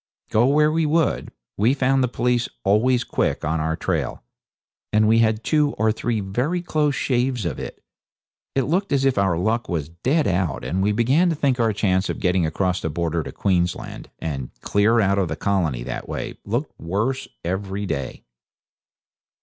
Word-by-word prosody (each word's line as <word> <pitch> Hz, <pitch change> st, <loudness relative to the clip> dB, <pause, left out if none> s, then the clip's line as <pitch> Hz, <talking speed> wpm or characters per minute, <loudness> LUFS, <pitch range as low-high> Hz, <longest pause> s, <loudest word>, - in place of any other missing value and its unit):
Go 115 Hz, +3 st, +4 dB
where 150 Hz, +2 st, +4 dB
we 160 Hz, 0 st, +1 dB
would, 160 Hz, 0 st, +1 dB, 0.3 s
we 115 Hz, +7 st, +3 dB
found 135 Hz, 0 st, +2 dB
the -, -, +2 dB
police 125 Hz, 0 st, 0 dB
always 120 Hz, +5 st, +3 dB
quick -, -, -1 dB
on 80 Hz, +1 st, 0 dB
our 80 Hz, +1 st, 0 dB
trail, 80 Hz, -10 st, -2 dB, 0.7 s
and 105 Hz, 0 st, +4 dB
we 115 Hz, +1 st, +5 dB
had 110 Hz, -1 st, +2 dB
two 150 Hz, -2 st, +2 dB
or 110 Hz, +1 st, +2 dB
three 115 Hz, 0 st, -1 dB
very 125 Hz, -, -1 dB
close 150 Hz, -4 st, +1 dB
shaves 125 Hz, -4 st, 0 dB
of 80 Hz, -6 st, -3 dB
it. -, -, -8 dB, 0.7 s
It 135 Hz, -, +2 dB
looked 180 Hz, -, 0 dB
as 135 Hz, -1 st, +2 dB
if 135 Hz, -6 st, +2 dB
our 95 Hz, -4 st, +2 dB
luck 110 Hz, +7 st, 0 dB
was 80 Hz, -4 st, -2 dB
dead 130 Hz, -, 0 dB
out, 90 Hz, -5 st, -1 dB
and 95 Hz, +4 st, -1 dB
we 105 Hz, +2 st, +2 dB
began 130 Hz, +11 st, +3 dB
to 165 Hz, -, 0 dB
think 135 Hz, -4 st, +1 dB
our 115 Hz, -2 st, +3 dB
chance 95 Hz, -2 st, +1 dB
of -, -, -3 dB
getting 90 Hz, -3 st, +2 dB
across 90 Hz, +3 st, -1 dB
the 80 Hz, -, -2 dB
border 85 Hz, +1 st, -1 dB
to -, -, -7 dB
Queensland, 90 Hz, -3 st, -1 dB
and 70 Hz, -5 st, -4 dB
clear 105 Hz, +3 st, +3 dB
out 100 Hz, -2 st, +2 dB
of 95 Hz, -, +1 dB
the 80 Hz, -, -3 dB
colony 80 Hz, -9 st, 0 dB
that -, -, -6 dB
way, -, -, -4 dB
looked 120 Hz, +8 st, -2 dB
worse 110 Hz, +10 st, -1 dB, 0.2 s
every 95 Hz, +3 st, -2 dB
day. 70 Hz, -8 st, -4 dB
105 Hz, 180 wpm, -22 LUFS, 90-130 Hz, 0.7 s, we